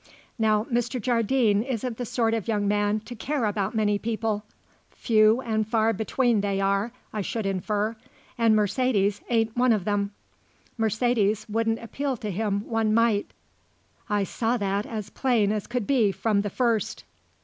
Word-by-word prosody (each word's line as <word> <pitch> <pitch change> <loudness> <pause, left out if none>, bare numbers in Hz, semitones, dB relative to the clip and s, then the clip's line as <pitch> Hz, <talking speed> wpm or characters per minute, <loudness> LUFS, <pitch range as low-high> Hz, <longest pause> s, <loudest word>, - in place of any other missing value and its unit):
Now 215 -1 +3
Mr. 240 +1 -1
Jardine 230 -2 +2
isn't 245 -1 -3
the 245 - -4
sort 225 -1 +1
of 225 -2 -2
young 210 -3 0
man 205 +1 +1
to 245 - -9
care 260 +2 -2
about 205 0 -1
many 210 -2 +1
people; 220 -2 -2 0.5
few 220 +1 +3
and 220 -3 -1
far 225 0 +2
between 225 +1 +1
they 200 -1 -1
are, 195 +3 +1 0.2
I 215 - -2
should 220 +2 -3
infer, 205 +3 -1 0.4
and 230 -2 +3
Mercedes 210 -2 +1
ain't 225 -2 +1
one 250 0 +3
of 210 -5 +1
them. 205 -1 0 0.7
Mercedes 220 -1 +1
wouldn't 225 +1 0
appeal 270 +3 -3
to 210 -1 -4
him 200 +1 -2
one 225 -2 +1
mite. 230 -3 +2 0.8
I 205 -1 +1
saw 230 +5 -1
that 200 0 -1
as 210 -3 -5
plain 235 -6 +1
as 210 -2 -2
could 245 -3 -2
be 230 -6 +3
from 205 0 +1
the 205 - -3
first." 230 -1 -1
220 Hz, 160 wpm, -26 LUFS, 205-235 Hz, 0.8 s, Now